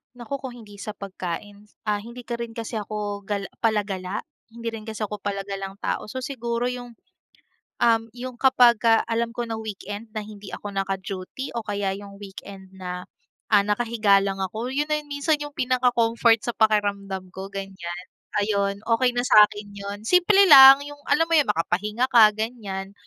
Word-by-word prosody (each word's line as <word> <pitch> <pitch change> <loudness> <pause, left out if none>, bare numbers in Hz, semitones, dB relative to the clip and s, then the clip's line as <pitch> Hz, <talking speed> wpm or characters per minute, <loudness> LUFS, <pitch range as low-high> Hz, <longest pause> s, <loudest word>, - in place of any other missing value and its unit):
Naku 245 +3 -5
kung 260 -2 -7
hindi 210 -4 -13
sa 205 +2 -6
pagkain, 200 +1 -7 0.2
ah, 210 - +2
hindi 235 +4 -9
ka 235 0 -5
rin 235 -1 -6
kasi 225 0 -5
'ko 205 -1 -4
gal 200 -1 -3
palagala, 205 -4 -1 0.3
hindi 235 0 -4
rin 225 -1 -8
kasi 220 -1 -7
ako 210 0 -3
palagalang 195 -1 -4
tao - - -2
so 260 +5 -6
siguro 240 -2 -2
yung, 245 -1 -7 0.9
um, 225 -1 +4
yung 250 0 -7
kapag 250 -3 +5
ka 225 0 +4
alam 230 0 -1
ko 235 -1 -4
na 225 - -3
weekend 215 0 -7
na 215 - -3
hindi 205 -2 -10
ako 205 - -6
naka-duty 195 +4 -4
o 230 - -3
kaya 200 -2 -2
yung 200 0 -11
weekend 195 -1 -10
na, 180 -1 -6 0.4
ah, 205 -2 +5
nakahiga 210 -2 +3
lang 195 -1 -2
ako, 205 +5 -3
yun 280 +3 0
na 300 0 -1
minsan 290 +1 0
yung 290 -1 -7
pinaka-comfort 240 -3 +2
sa 240 - -1
pakiramdam 200 -4 0
ko 190 +1 -7
ganiyan. 190 -3 -7 0.4
Ayun 200 -1 0
okey 245 +1 +2
na 245 - +1
sakin 210 -4 +5
yun, 200 0 -6
simple 365 - +5
lang 275 -4 +10
yung 290 0 -10
alam 325 - +4
mo 335 - -7
yung 280 - -1
makapahinga 210 +5 0
ka 225 -3 +9
ganiyan 205 -4 -4
215 Hz, 170 wpm, -24 LUFS, 200-240 Hz, 0.9 s, lang